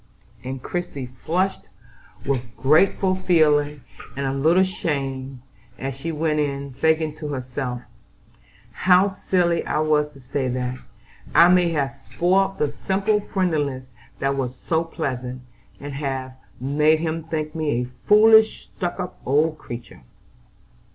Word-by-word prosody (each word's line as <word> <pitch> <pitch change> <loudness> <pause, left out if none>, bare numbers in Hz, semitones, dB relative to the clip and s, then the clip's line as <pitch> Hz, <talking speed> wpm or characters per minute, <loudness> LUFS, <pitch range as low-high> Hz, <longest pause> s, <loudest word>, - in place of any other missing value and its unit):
and 130 0 -6
Christie 175 -7 -4
flushed 170 - -2 0.6
with 135 -2 +1 0.2
grateful 185 +6 +3
feeling 150 -5 +2 0.4
and 140 - -1
a 135 - -1
little 160 +7 +4
shame, 135 -7 -3 0.3
as 135 0 -4
she 160 +5 -4
went 155 -1 0
in, 140 -2 -2
thinking 160 +3 +1
to 155 - -5
herself: 130 -2 -4 0.9
"How 185 +1 +4
silly 180 -3 0
I - - -2
was 150 -1 +2
to 140 - -15
say 130 +1 -2
that! 125 0 -2 0.6
I 170 +2 +8
may 180 -1 +4
have 140 -3 0
spoilt 185 +8 0
the 145 -1 0
simple 200 +2 +2
friendliness 155 -10 -1 0.3
that 140 0 0
was 130 -2 -3
so 160 0 0
pleasant, 130 -6 -4 0.4
and 145 0 -7
have 135 -2 -3 0.3
made 150 +4 +2
him 165 0 -2
think 155 -1 -4
me 160 -2 -2
a 125 0 -13
foolish 220 +1 +6
stuck 180 -1 -3
up 180 -1 -6
old 155 +3 +1
creature." 120 - -9
150 Hz, 135 wpm, -23 LUFS, 135-175 Hz, 0.9 s, I